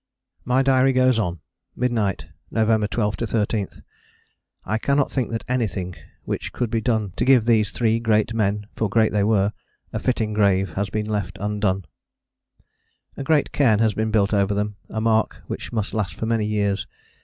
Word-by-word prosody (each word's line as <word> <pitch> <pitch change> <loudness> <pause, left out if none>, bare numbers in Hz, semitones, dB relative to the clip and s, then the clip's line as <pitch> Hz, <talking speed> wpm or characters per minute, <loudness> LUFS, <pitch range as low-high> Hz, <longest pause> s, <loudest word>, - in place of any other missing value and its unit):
My 125 +2 +3
diary 135 0 +4
goes 130 -2 +3
on: 90 -6 -2 0.3
Midnight, 115 -6 0 0.2
November 110 -1 +2
12 105 -1 -1
13. 110 -3 -1 1.0
I 110 +3 -1
cannot 140 +3 +1
think 130 -5 -1
that 115 -1 -4
anything 100 -8 -1 0.3
which - - -4
could 120 -3 -2
be 115 - 0
done 110 -5 0
to - - +1
give 130 -4 +5
these 110 -3 +3
three 115 -1 +1
great 110 -1 +1
men 105 -2 0
for 110 - -1
great 110 +1 +3
they 105 -1 +1
were 105 -1 +2 0.4
a - - -1
fitting 110 -4 0
grave 95 -4 +2
has 100 +2 -2
been 105 +1 -2
left 105 -4 -3
undone. 105 -2 -1 1.3
A 140 - -5
great 150 +1 +2
cairn 115 -7 +3
has 110 -1 +2
been 110 +3 -1
built 105 -1 +2
over 100 0 +2
them, 105 0 -2
a 110 - -3
mark 110 0 +1
which - - -6
must 110 -3 -2
last 110 -3 -2
for - - -4
many 110 -2 0
years. 100 -2 0
110 Hz, 175 wpm, -23 LUFS, 105-115 Hz, 1.3 s, give